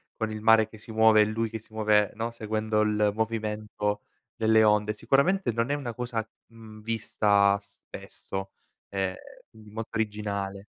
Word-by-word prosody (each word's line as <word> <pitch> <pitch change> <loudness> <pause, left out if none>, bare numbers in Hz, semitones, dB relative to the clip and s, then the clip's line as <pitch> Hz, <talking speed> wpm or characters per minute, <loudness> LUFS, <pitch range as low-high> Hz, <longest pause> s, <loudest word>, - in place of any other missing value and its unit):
con 110 -1 -3
il 110 - -6
mare 110 0 +5
che 110 -1 -14
si 110 - -11
muove 110 -1 +5
e - - +5
lui 110 +1 -2
che 110 - -4
si 110 0 -23
muove, 105 -2 +3
no, 115 +2 -3
seguendo 110 -1 -1
il 105 -1 +2
movimento 105 -2 -2 0.3
delle 110 0 +4
onde. 105 0 +2
Sicuramente 140 - +2
non 115 +2 -1
è 145 - +1
una 125 -5 -5
cosa, 115 -2 -3 0.2
mhmm, 110 -2 -13
vista 105 -2 +2
spesso, 100 -1 -8 0.4
ehm, 95 -1 -1 0.3
quindi 110 -1 -17
molto 110 +2 -7
originale. 100 -2 -3
110 Hz, 160 wpm, -27 LUFS, 105-115 Hz, 0.4 s, mare